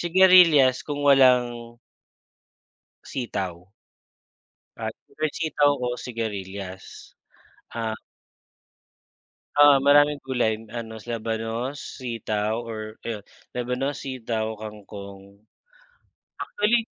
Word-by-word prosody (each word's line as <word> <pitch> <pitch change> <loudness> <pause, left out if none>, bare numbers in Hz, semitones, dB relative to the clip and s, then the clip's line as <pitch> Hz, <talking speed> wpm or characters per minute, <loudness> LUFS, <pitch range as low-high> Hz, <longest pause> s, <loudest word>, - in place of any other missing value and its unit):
sigarilyas 175 -7 +6
kung 145 -1 -3
walang 125 -4 +4 1.3
sitaw. 95 -8 -5 1.2
At - - -3 0.2
fresh 155 -1 -1
sitaw 145 -3 +2
o 125 - -1
sigarilyas. 100 -6 -6 0.6
Ha? 115 -1 -2 1.6
Oh, 145 -1 +7
maraming 145 +1 +5
gulay 115 -4 0
ano, 110 -1 -7
labanos, 115 +3 -3 0.2
sitaw 110 -3 -2
or 110 -1 -7
ayon, 110 -3 -4 0.3
labanos, 125 +3 -2
sitaw, 115 -4 -3
kangkong. 100 -1 -10 1.0
Actually 225 +2 +1
120 Hz, 80 wpm, -25 LUFS, 110-140 Hz, 1.6 s, Oh